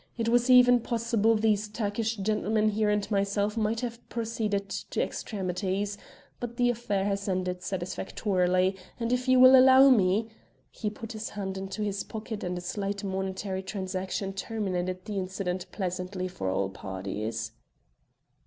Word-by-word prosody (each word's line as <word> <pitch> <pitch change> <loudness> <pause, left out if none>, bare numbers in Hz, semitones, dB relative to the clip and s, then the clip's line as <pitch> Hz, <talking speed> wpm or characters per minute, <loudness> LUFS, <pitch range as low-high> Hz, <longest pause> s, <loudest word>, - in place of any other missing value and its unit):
It 230 -1 0
was 240 +1 +3
even 245 -1 +7
possible 230 -1 +1
these 215 -1 +2
Turkish 220 +1 -2
gentlemen 215 +1 +1
here 215 0 +1
and 210 -1 +1
myself 200 +1 +1
might 225 0 0
have 235 -2 -4
proceeded 220 -3 -2
to - - -4
extremities, 195 0 -2 0.4
but 240 -1 -6
the 245 0 +3
affair 205 -5 -1
has 200 0 -1
ended 180 -1 -1
satisfactorily, 185 0 0 0.2
and 235 +1 0
if 250 +1 -1
you 255 0 +5
will 255 +1 +9
allow 265 +1 +8
me 215 0 +3 0.2
" - - -39
He 215 - -3
put 220 +1 -8
his 220 -1 -5
hand 195 -2 -4
into 195 +2 -4
his 200 -1 -2
pocket 220 -1 -6
and 180 0 -2
a - - -4
slight 200 +2 -3
monetary 190 0 -3
transaction 190 0 -3
terminated 185 -3 -3
the 210 -2 -3
incident 185 -1 -3
pleasantly 185 -1 -3
for 180 - -4
all 95 +1 0
parties. 105 +4 -4
200 Hz, 155 wpm, -28 LUFS, 185-225 Hz, 0.4 s, will